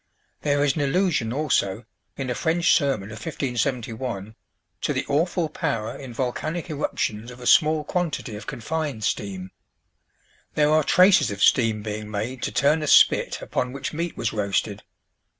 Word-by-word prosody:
There 145 -1 +1
is 140 -2 +2
an 155 - -1
allusion, 145 - +1
also, 120 -7 0 0.3
in 130 -2 -3
a - - +1
French 170 +6 +2
sermon 135 - +1
of 110 - -8
1571, 120 -5 -3 0.5
to - - 0
the - - -2
awful 165 +3 +1
power 120 -8 -3
in 135 -3 -9
volcanic 155 +8 -3
eruptions 115 -6 -2
of 125 0 -11
a 125 - -9
small 155 +3 +4
quantity 155 - -2
of 105 - -9
confined 145 -1 -3
steam. 95 -3 -3 1.0
There 150 0 +3
are 155 0 +4
traces 185 +5 +5
of 100 -1 -2
steam 110 -4 +3
being 105 0 -5
made 110 +4 -4
to - - -2
turn 150 +3 +2
a 150 - -2
spit - - +4
upon 125 0 -2
which 140 +2 -5
meat 170 +2 -3
was 115 - -1
roasted. 100 -2 -1
130 Hz, 160 wpm, -24 LUFS, 110-155 Hz, 1.0 s, traces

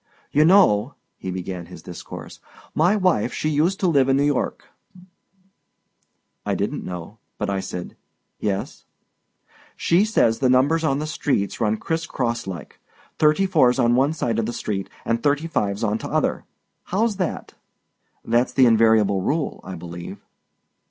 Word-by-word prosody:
"You 150 +2 +4
know," 145 - +4 0.2
he 95 - -5
began 90 -1 -5
his - - -12
discourse, - - -9 0.3
"my 175 +6 +3
wife 185 - +1
she 155 -1 -1
uset 180 +5 +2
to 190 - +3
live 140 -5 +3
in 135 +1 +3
N' 145 - +3
York!" 145 -2 -1 1.7
I - - -1
didn't - - -2
know, 90 +4 -7 0.2
but - - -2
I 100 - -1
said 90 -2 -6 0.4
"Yes." 100 -2 -3 0.9
"She 175 +4 +3
says 165 - +2
the 130 - +2
numbers 140 +6 +3
on 135 -3 +1
the 150 - -3
streets 135 -9 -1
runs 110 -1 +1
criss 165 +6 -3
cross 120 -5 -2
like. 85 -7 -8 0.4
Thirty 155 +5 +4
four's 145 -10 +3
on 120 -2 +3
one 135 +5 +3
side 115 -7 -1
o' - - +3
the 115 +2 -3
street 95 -4 -3 0.2
an' 115 0 +1
thirty 145 +4 +1
five 105 -9 -1
on 110 0 0
t'other. - - -1 0.4
How's 210 +2 0
that?" 185 -3 -3 0.7
"That 120 +2 +2
is - - -14
the 130 - +5
invariable 110 -4 +4
rule, 150 - -1
I 95 - -7
believe." 85 0 -8
125 Hz, 160 wpm, -22 LUFS, 105-155 Hz, 1.7 s, the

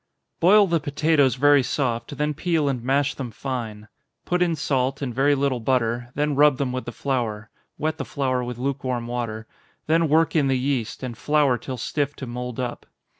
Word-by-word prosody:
_ - - -51
Boil 205 +4 +6
the 170 -3 +1
potatoes 145 -3 +2
very 145 +1 +5
soft, 120 -2 -2
then 150 0 0
peel 160 -1 0
and 130 -4 -2
mash 135 +2 +1
them 130 -3 -5
fine. 115 -3 -5 0.4
Put 180 0 0
in 170 -2 +2
salt, 135 -2 0
and 125 -3 -3
very 140 +4 +3
little 135 -2 0
butter 120 0 0
then 150 +1 0
rub 145 -1 +5
them 135 -2 -1
with 130 0 -4
the 120 - -5
flour 115 -6 -3 0.3
wet 155 +1 -2
the - - -1
flour 130 -3 -1
with 120 -1 -5
lukewarm 130 -2 -2
water 115 -2 -4 0.4
then 165 0 +2
work 160 +3 +3
in 145 -4 +3
the 135 -1 +2
yeast, 130 -3 -2
and 125 -2 -4
flour 145 0 +2
till 130 +2 -6
stiff 145 +4 -2
to 135 - -7
mould 125 0 -5
up. 125 -1 -4
135 Hz, 195 wpm, -24 LUFS, 125-145 Hz, 0.4 s, Boil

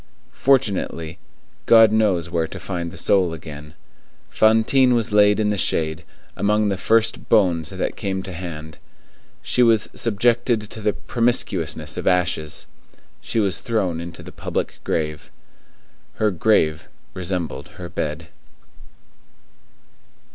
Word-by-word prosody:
Fortunately, 100 -11 0 0.5
God 115 -2 +7
knows 105 -6 +2
where 85 -2 -1
to - - -9
find 85 -3 -4
the - - -11
soul 95 -4 +2
again. 75 -1 -10 0.6
Fantine 115 +4 +4
was 115 -2 0
laid 105 0 +4
in 105 -1 +1
the 105 - -1
shade, 80 0 0 0.3
among 105 0 +1
the 100 - 0
first 115 +3 +1
bones 85 -8 +3
that - - -3
came 95 -1 -3
to 95 - -7
hand; 80 -3 -8 0.6
she 125 - +1
was 115 -3 +3
subjected 120 +1 +1
to 110 - -8
the 105 -1 +1
promiscuousness 85 -10 -1
of - - -4
ashes. 85 -4 0 0.6
She 115 - -2
was 100 -5 0
thrown 95 -8 -1
into 85 0 -9
the - - -10
public - - -4
grave. 75 -1 -3 0.9
Her 110 -1 +1
grave 80 -5 +1 0.3
resembled 90 -2 -3
her 90 - -7
bed. 80 0 -4
95 Hz, 125 wpm, -21 LUFS, 80-110 Hz, 0.9 s, God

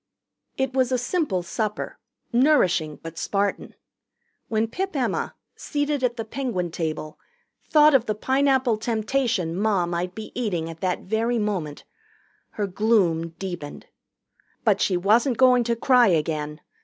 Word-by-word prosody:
It 265 -1 -1
was 260 -1 +1
a 255 - +2
simple 245 - -1
supper, 210 +5 -3 0.3
nourishing 190 - +3
but 165 0 -7
Spartan. 200 0 -2 0.7
When 220 0 0
Pip 380 +8 -4
Emma, 260 -3 -1 0.2
seated 290 -2 -2
at 240 -1 0
the 225 - -4
Penguin 220 -8 -3
table, 155 -2 -4 0.5
thought 300 -1 +6
of 250 -3 +3
the 215 - 0
Pineapple 265 0 +2
Temptation 220 -5 -1
Ma 200 -2 +1
might 175 +1 -3
be 220 -1 -7
eating 175 -9 -2
at 165 - -12
that 185 -1 -1
very 225 +4 0
moment, 190 -9 -3 0.7
her 210 - -1
gloom 185 -5 +1
deepened. 175 -6 -6 0.8
But 205 -3 +3
she 185 - +2
wasn't 225 +7 +3
going 250 -2 +5
to 235 0 +1
cry 245 0 +4
again. 155 -3 -1
215 Hz, 140 wpm, -24 LUFS, 175-250 Hz, 0.8 s, thought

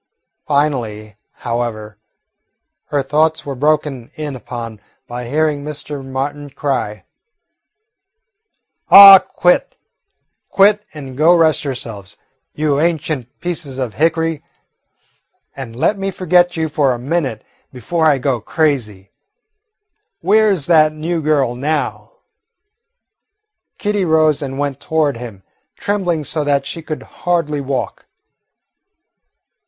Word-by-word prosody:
Finally, 120 -8 -1 0.2
however, 115 -3 -5 0.9
her 145 -2 -1
thoughts 155 +3 +1
were 140 - -4
broken 145 -3 -1
in 150 -3 -5
upon 115 -3 -8 0.2
by 120 0 -7
hearing 150 0 0
Mr. 150 -1 -6
Martin 140 +2 -4
cry: 130 -8 -3 1.8
"Oh, 195 -1 +11
quit, 180 -1 +1 0.7
quit, 205 +1 +4
and 135 -4 -8
go 160 +5 +5
rest 160 -2 +3
yourselves, 115 -8 -7 0.4
you 150 -2 0
ancient 155 -6 -2
pieces 165 -6 -4
of 125 -5 -3
hickory, 165 0 0 1.1
and 125 -4 -8
let 200 - 0
me 195 0 -2
forget 180 -1 +2
you 160 0 0
for 145 -4 +1
a - - -4
minute 135 -3 -2 0.3
before 160 +6 -1
I 145 -3 +4
go 130 -3 -1
crazy. 110 - -1 1.1
Where 215 +4 +4
's 150 -6 -4
that 155 -3 +4
new 160 +2 -3
girl 145 -5 +1
now?" 145 - -3 1.6
Kitty 205 -2 -1
rose 155 -2 +2
and 135 -1 -5
went 140 -1 -2
toward 155 -5 0
him, 115 -5 -9 0.3
trembling 180 -6 -1
so 150 +2 -2
that 140 -1 0
she 165 +4 -6
could 155 -1 -6
hardly 165 -5 -2
walk. 135 -1 -4
145 Hz, 115 wpm, -17 LUFS, 130-160 Hz, 1.8 s, Oh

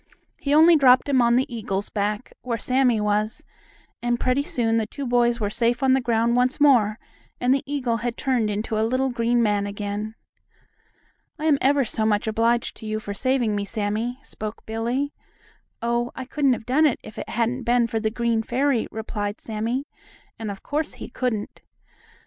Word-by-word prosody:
He 280 - -2
only 325 +2 +7
dropped 260 -3 +5
him 270 -3 +3
on 235 0 +4
the 250 -1 0
eagle's 200 -3 -3
back, 210 +2 -2
where 235 -2 -2
Sammie 250 0 +2
was, 210 +2 0 0.6
and 240 0 0
pretty 255 +2 +1
soon 230 -5 0
the 220 -1 0
two 280 +5 -6
boys 240 -1 +2
were 205 -2 -1
safe 240 +3 0
on 260 -1 +5
the 265 - +3
ground 235 0 +1
once 250 +4 +1
more, 235 -8 +4 0.4
and 250 +1 +3
the 275 - +1
eagle 250 -5 0
had 235 0 -3
turned 250 -6 +1
into 215 +1 -2
a - - +2
little 255 +4 +1
green 235 0 +1
man 205 -2 +1
again. 205 +2 -4 1.2
"I'm 305 -2 +2
ever 275 0 +3
so 220 0 -1
much 210 0 +1
obliged 230 +2 +1
to 220 - -9
you 215 0 -2
for 205 -2 -6
saving 245 -1 +1
me, 205 - -1
Sammie," 215 +4 -2
spoke 215 -4 -7
Billie. 240 +6 -2 0.7
"Oh, 235 +1 0
I 260 - -5
couldn't 275 0 +2
have 225 - -5
done 295 +6 +4
it 265 - -1
if 215 - -9
it - - -6
hadn't 235 +3 -1
been 240 0 +2
for 225 -1 -2
the 220 0 0
green 230 0 0
fairy," 250 +1 0
replied 210 -2 -4
Sammie, 230 +5 -3 0.5
and 220 -2 -4
of 195 -1 -7
course 300 +1 -2
he - - -8
couldn't. 240 -4 -3
235 Hz, 185 wpm, -24 LUFS, 215-255 Hz, 1.2 s, only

